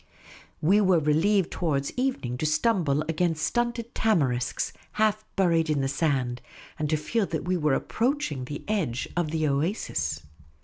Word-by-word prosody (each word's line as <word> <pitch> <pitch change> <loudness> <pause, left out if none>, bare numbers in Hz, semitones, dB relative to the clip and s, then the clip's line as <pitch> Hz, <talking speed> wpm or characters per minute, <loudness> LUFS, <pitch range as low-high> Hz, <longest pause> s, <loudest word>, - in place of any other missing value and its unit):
We 195 +7 +5
were 185 -3 +4
relieved 165 +5 +2
towards 140 -5 -1
evening 250 - -1
to 155 - -1
stumble 155 -4 +2
against 165 0 0
stunted 240 -1 -1
tamarisks, 135 - +1 0.2
half 215 0 +1
buried 165 -4 +2
in 140 -3 +1
sand, 135 -4 0 0.4
and 150 -1 -1
to 155 - +2
feel 205 +7 -1
that 160 -2 -3
we 185 +1 +1
were 150 -5 +2
approaching 230 - -1
the 145 +2 -6
edge 170 - -1
of 175 -3 0
the 155 0 0
oasis. 140 - -1
160 Hz, 145 wpm, -27 LUFS, 140-205 Hz, 0.4 s, We